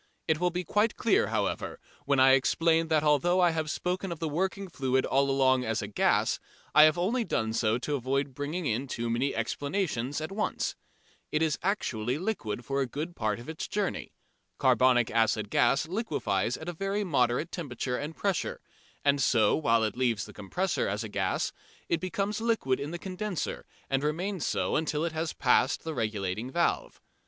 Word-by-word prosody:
It 160 -2 +2
will 180 0 +2
be 180 +1 -3
quite 210 +6 +1
clear, 215 - +3
however, 105 -2 -2 0.3
when 140 -1 +2
I 130 0 +7
explain 165 +5 +3
that 155 -2 +2
although 155 +5 +3
I 175 -2 +5
have 160 -1 -2
spoken 180 +3 -2
of 170 - -4
the 160 - -2
working 190 +5 -2
fluid 130 -6 0
all 140 +1 +2
along 130 -1 +3
as 110 -3 -1
gas, - - +2 0.3
I 150 - +9
have 155 +2 +3
only 225 +8 +1
done 110 - -1
so 110 0 +2
to 145 +4 -3
avoid 135 +1 -1
bringing 150 +6 -3
in 125 +2 -1
too 120 -2 -3
many 130 +4 0
explanations 140 - -2
at 155 +4 -5
once. 210 +2 -2 0.6
It 155 +1 +2
is 155 -3 0
actually 130 - -1
liquid 150 - -3
for 140 +1 0
a 135 - 0
good 155 +7 -5
part 110 -1 -1
of 120 - -11
its 160 0 -5
journey. 205 -2 -2 0.5
Carbonic 125 -3 +4
acid 110 -2 +1
gas 140 +3 +3
liquefies 125 - -1
at 160 - -9
a 175 - -3
very 195 +4 -1
moderate 135 -2 +1
temperature 130 -6 -3
and 150 +3 -5
pressure, 195 -3 -1 0.5
and 140 -1 +3
so 120 -3 +4
while 115 -7 +2
it 110 -2 -1
leaves 120 -4 0
the - - -12
compressor 180 - -1
as 105 +3 -2
a 110 - -6
gas 95 -2 -1 0.4
it 170 - +1
becomes 200 +3 -2
liquid 225 - +1
in 140 - -4
the 175 - -4
condenser 190 +1 -4 0.2
and 135 0 0
remains 175 +4 -1
so - - 0
until 155 0 0
it 170 - -1
has 160 0 -2
passed 130 +1 +2
the 160 - -4
regulating 110 -2 -2
valve. 175 - 0
145 Hz, 185 wpm, -29 LUFS, 125-175 Hz, 0.6 s, I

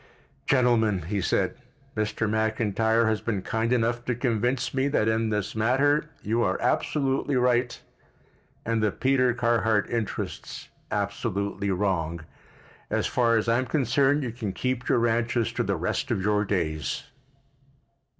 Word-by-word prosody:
"Gentlemen," 115 - +3
he 100 +4 -2
said, 85 - 0 0.4
"Mr. 110 +1 -1
McIntyre 110 +1 +1
has 110 -1 0
been 105 -5 -2
kind 115 +1 -1
enough 120 0 +1
to 125 - 0
convince 125 +1 0
me 135 +1 +1
that 140 -6 +1
in 110 0 +1
this 105 -1 -2
matter 140 +7 +2
you 115 +3 0
are - - +1
absolutely 135 -1 0
right 125 -1 +1 0.9
and 115 -1 0
the 105 - +3
Peter 130 -1 +2
Carhart 115 -3 +2
interests 115 -3 -4 0.2
absolutely 100 -1 -2
wrong. 90 -4 -1 0.7
As - - 0
far 115 -2 +2
as 110 - -1
I 115 +1 +3
am 130 - -2
concerned 140 +2 +2
you 120 - -3
can 110 -5 -4
keep 125 +4 -2
your - - +4
ranches 115 0 +1
to - - -1
the - - 0
rest - - -2
of - - 0
your 105 0 +2
days." 80 -7 -2
115 Hz, 145 wpm, -26 LUFS, 105-125 Hz, 0.9 s, your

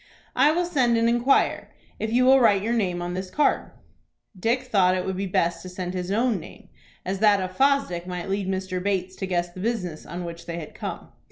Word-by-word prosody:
"I 275 +4 +5
will 350 +2 +1
send 255 -9 +2
and 230 0 +3
inquire, 240 +3 +2 0.3
if 220 - -2
you 250 +2 +3
will 265 +1 +7
write 205 -5 +4
your 230 +2 0
name 180 -6 0
on 175 0 -4
this 185 +1 -4
card." 295 +8 +1 0.7
Dick 230 +7 0
thought 190 -7 +3
it 185 - -2
would 190 - -2
be 195 +1 -2
best 170 -1 0
to 185 - -8
send 180 0 -5
his 180 -1 -4
own 225 0 +1
name, 160 - -13 0.4
as 190 +1 -2
that 210 -1 +5
of 185 0 -4
Fosdick 270 -11 +1
might 180 -1 -5
lead 195 0 -2
Mr. 190 -1 -2
Bates 190 -1 -1
to 190 - -3
guess 175 -1 -1
the 185 - -10
business 185 -7 -3
on 175 +1 -5
which 170 0 -8
they 170 0 -4
had 155 -3 -8
come. - - -6
190 Hz, 225 wpm, -25 LUFS, 180-235 Hz, 0.7 s, will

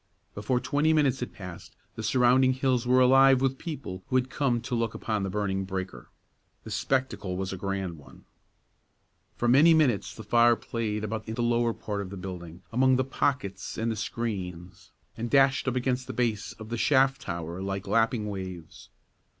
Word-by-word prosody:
Before 105 +5 -1
twenty 145 +5 +1
minutes 140 -4 +2
had 125 - -4
passed, 90 -4 -10 0.2
the - - -7
surrounding 125 +3 +4
hills 130 -2 0
were 130 +1 +5
alive 135 +1 +6
with 135 0 0
people 140 - -6
who 130 - -2
had 130 0 +1
come 130 -5 +1
to 125 +2 -6
look 115 -2 -1
upon 110 -2 -2
the 95 - -2
burning 95 -1 -1
breaker. 95 -9 -6 0.5
The - - -9
spectacle 130 -8 -1
was 95 0 -3
a - - -3
grand 95 -3 -4
one. 70 - -17 1.1
For 120 - -1
many 150 +7 +6
minutes 135 -10 +1
the 110 - -9
fire 120 +2 +4
played 110 -2 -3
about 110 +1 -4
in 110 - -4
the 120 - -1
lower 120 0 +2
part 105 -1 -4
of 95 - -6
the 100 - -8
building, 90 -1 -8
among 130 +2 +4
the 130 - +2
pockets 130 -8 -2
and 115 +1 -1
the - - -2
screens, 100 -6 -5 0.3
and 115 +1 -4
dashed 135 0 +3
up 130 - 0
against 125 0 -1
the - - -5
base 115 -3 -1
of 110 -1 -11
the 120 0 -3
shaft 135 0 +3
tower 85 0 -5
like 95 0 -3
lapping 115 -1 +1
waves. 95 -5 -7
115 Hz, 185 wpm, -27 LUFS, 95-130 Hz, 1.1 s, alive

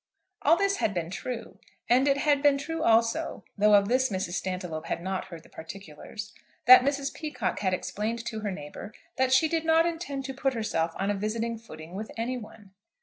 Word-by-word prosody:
All - - +5
this 395 +1 +1
had 205 - 0
been 170 -1 -2
true, 240 +4 -6 0.3
and 255 +3 +4
it 275 0 +3
had 285 0 +2
been 285 -1 +5
true 320 +3 -4
also, 230 -4 +2
though 210 0 +5
of 200 0 +4
this 260 +3 +2
Mrs. 185 -3 -3
Stantiloup 180 -3 -3
had - - -2
not 190 0 -2
heard 165 -3 -10
the - - -18
particulars, 195 +4 -9 0.3
that 255 +1 +10
Mrs. 275 +1 -1
Peacocke 295 - -3
had 190 -2 +1
explained 225 +5 -3
to 220 - -4
her 210 -1 -2
neighbour 185 +4 -8 0.2
that 260 0 +2
she 265 +5 +5
did 325 0 0
not 325 0 +4
intend 325 -5 -3
to 270 - -4
put 270 0 -1
herself 170 -7 -1
on 195 +1 0
a - - +1
visiting 225 +3 -2
footing 165 -7 -11
with 215 +3 -5
any 235 +3 -1
one. 215 -4 -10
225 Hz, 205 wpm, -28 LUFS, 195-275 Hz, 0.3 s, that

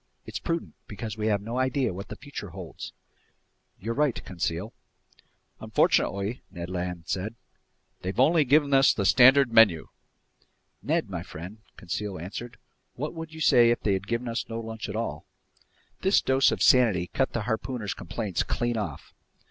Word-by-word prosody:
It's - - -5
prudent, 165 -1 -3
because 105 +1 -6
we 110 0 -2
have 100 -2 +1
no 115 +4 -3
idea 130 -4 +1
what 95 +2 -7
the - - -7
future - - -8
holds." - - -8 0.9
"You're 115 +5 -3
right, 145 -2 0
Conseil." 90 +3 -3 0.9
"Unfortunately," 100 +5 +1
Ned 85 -1 -7
Land 90 -1 -4
said, 100 +4 -3 0.7
"they've 95 +5 -4
only 155 +4 +5
given 140 +1 +3
us 135 0 +5
the 100 - -1
standard 130 +4 +6
menu." 105 -8 +5 0.9
"Ned - - 0
my - - -3
friend," 90 +7 -9 0.2
Conseil 95 +2 -4
answered, 115 +8 -7 0.4
"what 150 +4 -4
would 165 -1 -7
you 160 0 -9
say 120 -6 +6
if 120 - +1
they'd 95 -1 0
given 115 +2 -2
us 115 0 -3
no 115 0 -4
lunch 110 -1 -6
at - - -5
all?" - - -4 0.7
This 190 +2 +4
dose 130 0 +3
of - - -1
sanity 110 -9 +5
cut 130 +9 -1
the 120 - -1
harpooner's 110 -1 -3
complaints 100 0 -3
clean 120 0 -1
off. 85 -10 -5
115 Hz, 160 wpm, -27 LUFS, 95-130 Hz, 0.9 s, standard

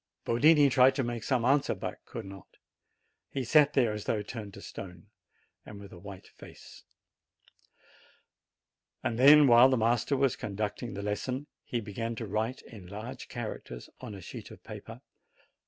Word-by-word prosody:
Yotini 145 +5 +5
tried 130 +1 +5
to 135 - 0
make 120 -1 -3
some 125 -4 0
answer, 140 +2 +2
but - - -6
could - - -7
not; 95 -1 -12 0.7
he 135 - -3
sat 150 +3 +4
there 120 -6 +2
as 105 -1 -6
though 105 -2 -1
turned 105 -1 -7
to 100 - -12
stone, 95 0 -10 0.5
and 100 - -11
with 100 -1 -12
a 85 - -11
white 100 0 -10
face. - - -14 2.2
Then, 140 +6 +7
while 120 0 +7
the 130 - +2
master 120 +5 +1
was 135 -2 +2
conducting 105 +3 -4
the 100 - -5
lesson, 125 +7 -3 0.2
he 120 - -3
began 115 +2 -4
to 115 - -5
write 110 +5 -2
in 100 -6 -12
large 110 +7 -8
characters 110 - -7
on 105 - -8
a 95 - -10
sheet - - -9
of - - -14
paper. - - -10
115 Hz, 160 wpm, -30 LUFS, 105-130 Hz, 2.2 s, Then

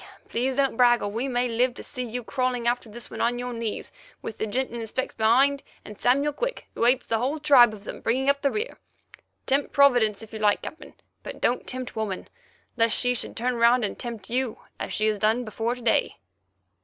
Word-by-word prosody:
Please 255 +3 -1
don't 275 -2 +1
brag, 240 -1 +5
or 205 - -1
we 230 +6 -2
may 250 -1 +1
live 245 +1 +1
to - - -8
see 250 - -4
you 245 +1 -5
crawling 255 -1 -1
after 240 -1 0
this 235 +3 -9
one - - -5
on 240 +1 +1
your 245 0 -4
knees, 230 -2 -4 0.3
with 220 - -6
the 220 - -1
gent 255 +5 -1
in 235 - -5
the 225 - -5
specs 260 +4 -3
behind, 265 +6 +3 0.2
and 210 - -11
Samuel 280 +4 +3
Quick, - - -3
who 230 - 0
hates 250 +1 +3
the 225 - 0
whole 270 +6 -1
tribe 275 -6 +6
of 210 -2 -10
them, - - -8
bringing 260 +4 0
up 280 0 +3
the 280 - +2
rear. 435 - -4 0.7
Tempt 275 +2 +1
Providence, 245 -7 +4
if 220 - -13
you 220 - -5
like, 210 -1 +2
Captain, 315 - -9 0.3
but - - -8
don't 245 - 0
tempt 255 -1 -5
woman, 215 -4 -3 0.5
lest 230 -1 +2
she 245 0 +2
should 245 - -5
turn 245 +1 0
round 235 0 +4
and 200 - -5
tempt 230 -5 -6
you, 250 -2 0 0.2
as - - -4
she 215 - 0
has 215 -1 +1
done 220 +4 +2
before 225 +3 -2
to 250 - -12
day." 230 - +2
245 Hz, 225 wpm, -25 LUFS, 225-260 Hz, 0.7 s, tribe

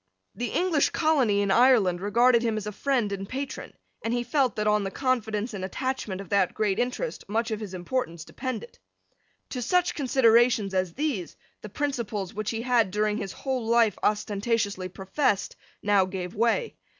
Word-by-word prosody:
The 245 - -3
English 345 -5 +2
colony 265 -11 +2
in 200 -1 +1
Ireland 215 -8 +4
regarded 235 +4 +4
him 225 -2 0
as 215 - -4
a 210 - -3
friend 240 -1 0
and 195 0 -5
patron; 270 +1 -5 0.3
and 225 - -1
he 240 - 0
felt 260 +1 +1
that 210 -1 -1
on 210 -1 +3
the 195 - -2
confidence 225 -2 -1
and 195 -2 -5
attachment 220 -2 -3
of 195 - -8
that 195 -3 +2
great 210 -1 0
interest 250 - -2
much 225 +2 0
of 215 - -2
his 200 -4 -6
importance 175 -4 -3
depended. 255 - -6 0.7
To 250 - -4
such 355 +9 +2
considerations 240 - +3
as 185 -2 -1
these 270 - -2 0.2
the 210 - -8
principles, 215 -6 -3
which 215 0 -3
he 225 0 -3
had, 240 -5 +3
during 210 +2 0
his 200 -4 -4
whole 260 -4 -3
life, 230 -3 +4
ostentatiously 205 -2 0
professed, 195 - -1 0.3
now 200 -2 +4
gave 185 -1 -5
way. 235 - 0
220 Hz, 175 wpm, -26 LUFS, 200-255 Hz, 0.7 s, Ireland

